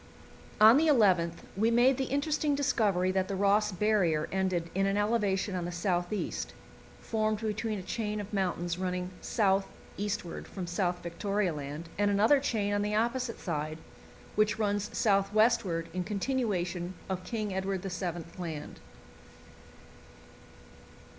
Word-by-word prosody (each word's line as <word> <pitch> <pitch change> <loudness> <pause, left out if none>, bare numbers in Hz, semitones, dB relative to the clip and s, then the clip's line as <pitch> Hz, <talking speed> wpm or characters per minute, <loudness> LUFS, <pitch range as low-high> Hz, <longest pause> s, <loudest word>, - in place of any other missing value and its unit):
On 220 +4 +9
the 320 +2 +3
11th 185 - +3
we 220 +4 +2
made 245 +3 +4
the 265 - 0
interesting 290 +2 0
discovery 210 -10 +1
that 190 0 0
the 195 - -3
Ross 205 +2 +3
Barrier 185 -6 +1
ended 185 -3 -1
in 195 +1 +1
an 195 +1 +1
elevation 205 -2 +1
on 180 -2 -2
the 175 - -4
south 175 0 -1
east, 210 - -3 0.5
formed 215 -1 -1
between 220 0 -2
a 190 - -6
chain 210 +2 -3
of 205 +1 -7
mountains 175 -3 -1
running 180 0 -2
south 195 -3 +2 0.3
eastward 200 -4 -4
from 185 -3 -6
South 175 0 -1
Victoria 195 +2 -1
Land 150 +3 -6
and 205 0 +3
another 215 +8 +4
chain 215 -7 0
on 205 - +1
the 210 +1 -1
opposite 235 +2 0
side, 155 -3 -3 0.6
which 215 +1 +2
runs 205 -2 0
south 195 -2 +2
westward 215 -7 +3
in 180 0 -1
continuation 195 -5 -2
of 185 -1 -3
King 215 -2 -3
Edward 190 0 -2
VII. 175 -3 -3 0.2
Land. 160 -4 -6
200 Hz, 145 wpm, -30 LUFS, 180-215 Hz, 0.6 s, On